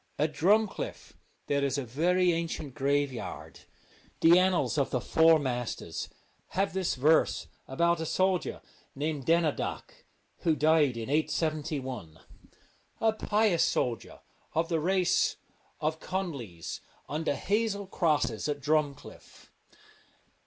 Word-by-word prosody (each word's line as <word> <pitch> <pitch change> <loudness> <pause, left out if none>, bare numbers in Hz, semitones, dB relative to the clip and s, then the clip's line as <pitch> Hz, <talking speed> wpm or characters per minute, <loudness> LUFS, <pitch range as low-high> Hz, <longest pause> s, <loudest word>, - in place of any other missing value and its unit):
At 150 +1 0
Drumcliff 205 +8 0 0.3
there 140 -1 0
is 140 0 0
a 140 - -2
very 175 +8 +2
ancient 165 -4 -3
graveyard. 140 -2 -2 0.6
The 170 +2 +7
Annals 175 -7 +2
of 140 - +1
the 125 - 0
Four 160 +6 +5
Masters 125 -5 -4 0.5
have 195 0 +1
this 190 -2 0
verse 150 +5 +3 0.2
about 170 +5 +1
a 160 - -3
soldier 185 +1 0 0.3
named 145 -1 -3
Denadhach, 165 -2 0 0.5
who 160 -2 +2
died 150 -5 +3
in 115 - -4
871: 150 - -2 0.8
'A 220 -1 +3
pious 210 -5 +2
soldier 120 -4 -1 0.3
of 165 +1 +1
the 165 -2 +1
race 185 +2 +2 0.4
of 155 +1 -1
Con 190 -1 -2
lies 100 - -7 0.3
under 155 -1 -1
hazel 205 +2 -1
crosses 150 - 0
at 145 -1 -2
Drumcliff.' 145 0 -3
155 Hz, 115 wpm, -29 LUFS, 140-175 Hz, 0.8 s, The